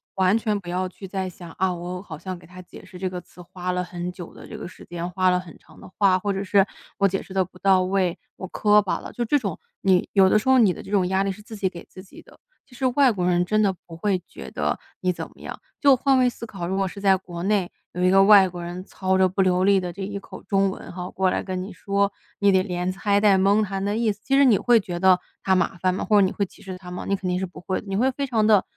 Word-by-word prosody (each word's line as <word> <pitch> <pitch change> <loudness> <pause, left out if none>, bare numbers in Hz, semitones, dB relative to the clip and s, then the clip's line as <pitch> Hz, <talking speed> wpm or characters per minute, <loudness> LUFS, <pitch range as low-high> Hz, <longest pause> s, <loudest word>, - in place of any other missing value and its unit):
完 190 +2 +3
全 215 -2 -1
不 180 - -15
要 185 +1 -1
去 190 +1 -10
再 190 0 -3
想， 175 -1 -11
“啊， 185 -1 +1
我 180 +1 -6
好 170 -6 -9
像 185 +3 -6
给 175 - -16
他 185 +1 -11
解 180 - -14
释 180 - -12
这 190 0 -1
个 180 -1 -6
词 180 - -16
花 180 +1 -5
了 180 0 -1
很 175 0 -5
久 180 -2 -10
的 - - -12
这 - - -8
个 - - -7
时 185 - -13
间， 175 0 -5
花 185 +1 +2
了 180 0 +2
很 175 -3 -11
长 - - -19
的 - - -12
话， 190 -2 +4
或 200 +1 -1
者 195 +1 -3
是 195 0 +4 0.3
我 200 - +4
解 195 0 -2
释 190 - -12
得 190 -1 +2
不 185 +1 -18
到 190 -1 +4
位， 185 -1 0 0.2
我 190 - -7
磕 210 +2 +4
巴 190 - -2
了”， - - -10
就 240 - -2
这 265 +6 +2
种， 200 -9 -4 0.2
你 185 -2 +2
有 195 -2 +6
的 - - +4
时 260 - -2
候 260 - +6
你 215 -7 +5
的 - - -9
这 - - -12
种 190 -3 +2
压 190 +1 +1
力 195 - -1
是 200 +2 -10
自 220 - -10
己 195 -2 0
给 170 -2 -11
自 185 - -12
己 190 - -15
的。 - - -20 0.3
其 250 - -18
实 260 +1 -2
外 255 +1 +4
国 185 -5 -2
人 175 0 +2
真 215 +4 +2
的 195 - +2
不 165 - -10
会 190 +1 0
觉 65 -1 -10
得 - - -1 0.2
你 185 - +2
怎 - - -6
么 - - -20
样。 - - -7 0.2
就 280 -2 +6
换 270 +1 +2
位 255 - +4
思 235 - -8
考， 195 -6 -6
如 190 - -2
果 195 0 0
是 200 - -8
在 195 -1 +4
国 175 -2 -8
内 195 -2 +1 0.2
有 180 - -2
一 180 - +5
个 195 0 +6
外 200 -1 +7
国 175 -1 -7
人 175 +1 -6
操 190 0 -1
着 190 0 +4
不 195 +2 0
流 185 0 +2
利 195 0 +4
的 180 -1 -4
这 195 +3 -6
一 200 +1 -4
口 - - -11
中 195 -1 +2
文 - - -9
哈， 180 0 -6
过 190 0 +1
来 - - -1
跟 185 -1 -4
你 200 - -8
说， 200 +1 0 0.3
你 200 -1 +4
得 190 -1 +4
连 180 -1 -2
猜 200 +1 +1
带 205 -2 +5
蒙 200 +3 +3
他 195 -1 -3
的 205 +1 -1
意 225 -1 +1
思， 205 - -9
其 270 - +1
实 280 - +6
你 230 -6 +5
会 240 +3 +4
觉 175 -4 -5
得 185 0 +5 0.2
他 190 - +3
麻 180 0 0
烦 185 +1 +1
吗？ 185 - -3
或 210 -2 +4
者 195 - +5
你 185 - -1
会 200 - -1
歧 - - -19
视 185 -1 -7
他 180 -1 -11
吗？ 180 - -6
你 200 - +1
肯 190 -1 -5
定 180 0 0
是 190 - -1
不 180 - -12
会， 185 +1 -2
你 195 - -3
会 255 +6 +2
非 275 +1 -3
常 225 -4 +1
地 210 -3 +5
190 Hz, 325 characters per minute, -24 LUFS, 180-205 Hz, 0.3 s, 外